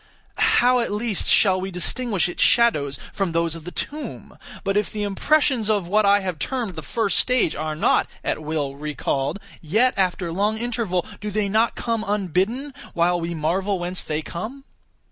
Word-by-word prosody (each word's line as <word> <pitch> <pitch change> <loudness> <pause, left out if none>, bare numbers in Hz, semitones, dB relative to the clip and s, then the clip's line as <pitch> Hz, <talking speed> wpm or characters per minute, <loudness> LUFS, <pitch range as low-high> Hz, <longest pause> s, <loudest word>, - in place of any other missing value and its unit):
How 250 +1 +4
at 235 - -1
least 210 -1 -1
shall 190 -3 +4
we 190 - -3
distinguish 195 +2 0
its 175 - -4
shadows 150 - +3 0.2
from 195 -4 -1
those 165 -1 +1
of 165 -1 -7
the 180 - -6
tomb? 300 +9 -6 0.3
But 195 -1 0
if 210 0 +1
the 210 -1 -3
impressions 230 +3 +2
of 205 -5 +1
what 210 +2 +3
I 200 0 +5
have 185 -5 -4
termed 235 - -2
the 160 - -5
first 205 - +1
stage 250 -9 +2
are 155 0 -3
not, 155 - +2 0.2
at - - -2
will, 150 -3 -2
recalled, 145 +1 -2 0.2
yet, 220 +11 +2
after 185 -2 0
long 205 +5 0
interval, 225 -6 -1
do 210 - -4
they 210 0 0
not 220 +4 +2
come 230 -2 -2
unbidden, 205 - -1 0.2
while 175 +1 +2
we 170 +1 -3
marvel 185 +6 0
whence 180 +1 -2
they 155 0 -3
come? 220 - -6
195 Hz, 180 wpm, -23 LUFS, 170-225 Hz, 0.3 s, I